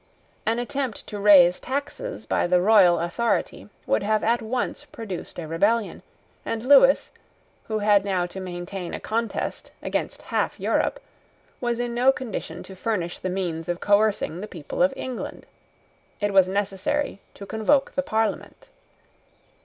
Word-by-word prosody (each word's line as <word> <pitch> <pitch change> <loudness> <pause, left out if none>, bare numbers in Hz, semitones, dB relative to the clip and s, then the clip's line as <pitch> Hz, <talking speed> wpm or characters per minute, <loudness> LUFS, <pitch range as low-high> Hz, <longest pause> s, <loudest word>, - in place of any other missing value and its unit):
An 225 +1 +2
attempt 260 -1 -3
to 205 - -6
raise 185 -4 +7
taxes 285 - -4
by - - +1
the 180 0 +4
royal 185 -3 +5
authority 210 +6 -1 0.2
would - - +1
have 215 +1 +1
at 235 +2 +2
once 245 +5 -3
produced 220 -10 -7
a 170 -3 -5
rebellion; 205 +7 +1 0.4
and 225 0 -3
Lewis, 270 +1 +6 0.6
who 220 - -1
had 205 -1 +4
now 190 -3 0
to 180 +2 -8
maintain 180 0 -5
a - - -6
contest 230 0 -3
against - - -3
half - - -1
Europe, - - 0 0.6
was 240 -1 -1
in 240 -1 -2
no 250 +3 +5
condition 255 -4 -6
to 190 - -11
furnish 185 -4 -2
the 185 - -3
means 175 -3 -3
of 175 0 -1
coercing 205 -4 +2
the 210 - -5
people 165 -7 -6
of 270 +1 +5
England. 255 -2 -6 0.7
It 205 -1 0
was 190 -1 +5
necessary 200 +7 -1 0.2
to 200 - -9
convoke 220 +7 +1
the 275 - +1
Parliament. 225 - -2
210 Hz, 150 wpm, -24 LUFS, 185-240 Hz, 0.7 s, raise